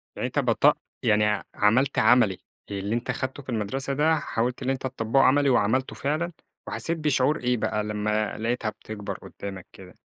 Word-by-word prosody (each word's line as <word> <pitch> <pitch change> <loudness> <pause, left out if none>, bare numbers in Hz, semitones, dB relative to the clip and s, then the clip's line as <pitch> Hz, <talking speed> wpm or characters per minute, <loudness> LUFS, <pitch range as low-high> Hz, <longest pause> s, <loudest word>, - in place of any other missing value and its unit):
يعني - - -2
أنت - - -1
بط - - +3 0.3
يعني 105 0 +4
ع 105 0 0
عملت 125 +7 +3
عملي، 115 -7 +4 0.3
اللي 100 +3 -2
أنت 120 - -2
خدته 130 +1 -4
في 130 - -14
المدرسة 125 +5 -2
ده 155 +3 +3
حاولت 125 0 -2
إن 130 - -1
أنت 135 -1 -1
تطبّقه 130 +1 +1
عملي 140 +1 +4
وعملته 125 +2 +2
فعلًا؟ 155 +5 -1 0.4
وحسيت 165 0 -2
بشعور 150 -1 +2
إيه 125 0 +1
بقى 105 -1 -1
لما 105 0 -1
لقيتها 115 0 -1
بتكبر 105 -1 -7
قدامك 95 -2 -8
كده؟ 90 -2 -13
120 Hz, 175 wpm, -26 LUFS, 105-135 Hz, 0.4 s, يعني